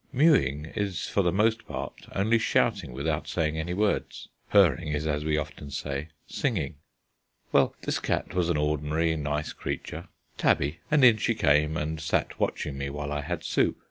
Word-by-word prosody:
Mewing 130 - +3
is 100 -4 -2
for 100 - +1
the 90 -2 +2
most 110 +4 +1
part - - -6
only 110 +4 +3
shouting 105 - +1
without 75 +5 -2
saying 80 -2 -1
any 90 +3 -2
words. 105 +1 -1 0.2
Purring 85 -5 +4
is, 75 0 -2
as 75 -1 -1
we 75 0 +1
often 75 -1 -5
say, 70 +1 -4 0.2
singing. 85 - -2 0.7
Well, - - +3
this - - -1
cat - - -2
was 90 -2 +1
an 85 - +2
ordinary 75 +2 0
nice 75 0 -2
creature, 85 +3 -5 0.3
tabby, 75 +4 +2
and 150 -3 +5
in 115 -3 +7
she 115 +2 0
came, 75 -3 +3
and 80 0 -3
sat 80 - -1
watching 70 -2 -2
me 70 0 -2
while 75 +1 -4
I 75 0 -1
had 85 +2 -4
soup. - - +1
80 Hz, 175 wpm, -27 LUFS, 75-100 Hz, 0.7 s, in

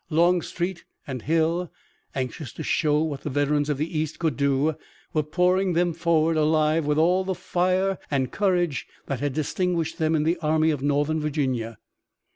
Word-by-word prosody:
Longstreet 175 +1 +1 0.2
and 130 -3 -5
Hill, 165 +4 0 0.4
anxious 130 0 -4
to 160 - -6
show 150 0 +2
what 145 -4 -3
the - - -4
veterans 145 +1 +1
of 145 - 0
the 155 +4 -3
East 155 0 -3
could 160 -6 0
do, 140 +3 +2 0.4
were 155 - +2
pouring 180 +4 +1
them 175 0 +2
forward 165 -1 +2
alive 155 0 +2
with 150 0 +1
all 180 +4 +3
the 190 0 -2
fire 185 +2 0
and 135 -3 0
courage 175 -7 0 0.2
that 135 -3 -3
had 145 0 -1
distinguished 165 +2 -1
them 160 0 +2
in 150 - +1
the 165 +3 +1
Army 160 0 +2
of 145 -4 -3
Northern 145 +2 +1
Virginia. 130 -7 -2
155 Hz, 170 wpm, -25 LUFS, 145-170 Hz, 0.4 s, all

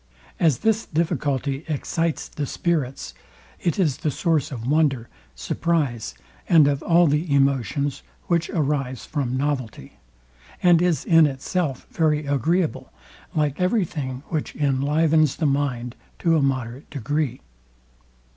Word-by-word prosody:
As 160 -7 +3
this 220 0 +2
difficulty 145 -4 -1
excites 165 +2 -2
the 145 -2 -4
spirits, 135 - -2 0.5
it 170 - -1
is 155 -9 +1
the 155 - -1
source 155 +1 0
of 115 -4 -6
wonder, 140 -5 +1 0.3
surprize, 125 - -1 0.3
and 160 -4 +6
of 140 -1 0
all 175 0 +4
the 150 +1 0
emotions, 140 0 +1 0.2
which 170 -1 0
arise 140 - -1
from 130 -4 -2
novelty; 130 -5 -3 0.6
and 175 -2 +6
is 175 -6 +1
in 165 -2 +6
itself 140 +1 -2
very 155 -2 +1
agreeable, 155 +5 0 0.4
like 150 0 0
every 185 +2 +2
thing, 130 -5 -5
which 155 -3 -3
inlivens 150 +2 +2
the 160 - -1
mind 135 -4 -1 0.2
to 165 -1 +2
a 155 - +3
moderate 130 -1 -2
degree. 145 0 -2
145 Hz, 125 wpm, -23 LUFS, 135-165 Hz, 0.6 s, and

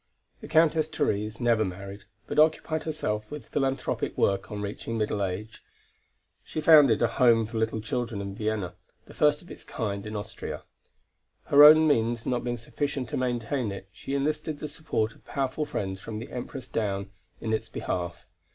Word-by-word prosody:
The - - -9
Countess 160 -1 +4
Therese 110 -8 -1
never 120 -3 +3
married, 100 +1 -7 0.2
but - - -1
occupied 155 0 +2
herself 110 -9 -2
with 145 -6 -8
philanthropic 135 -2 -1
work 100 +1 +1
on 105 - -4
reaching 105 +3 -4
middle 105 -2 0
age. 100 +4 -5 0.8
She - - -5
founded 150 -7 +6
a - - +5
home 115 -4 +4
for 110 +1 -4
little 110 0 0
children 110 0 -3
in 100 0 -5
Vienna, 105 -3 -2 0.3
the - - -14
first 150 +2 +2
of 175 - -14
its - - -10
kind 100 -2 -4
in 105 - -6
Austria; 105 +1 -6 0.8
her 145 +1 +7
own 155 +1 +9
means 115 -4 +1
not 125 -1 0
being 120 0 -2
sufficient 130 +1 -3
to - - -3
maintain 120 -1 -1
it, 100 0 -8
she 135 +9 -5
enlisted 150 +2 -1
the 150 - -5
support 130 -7 -2
of - - -23
powerful 135 +2 -2
friends 95 -8 -4
from 110 - -7
the 110 +2 -6
Empress 125 +1 -6
down, 100 -4 -2 0.3
in 110 -1 -2
its 110 - -2
behalf. 85 -1 -4
115 Hz, 175 wpm, -27 LUFS, 105-145 Hz, 0.8 s, own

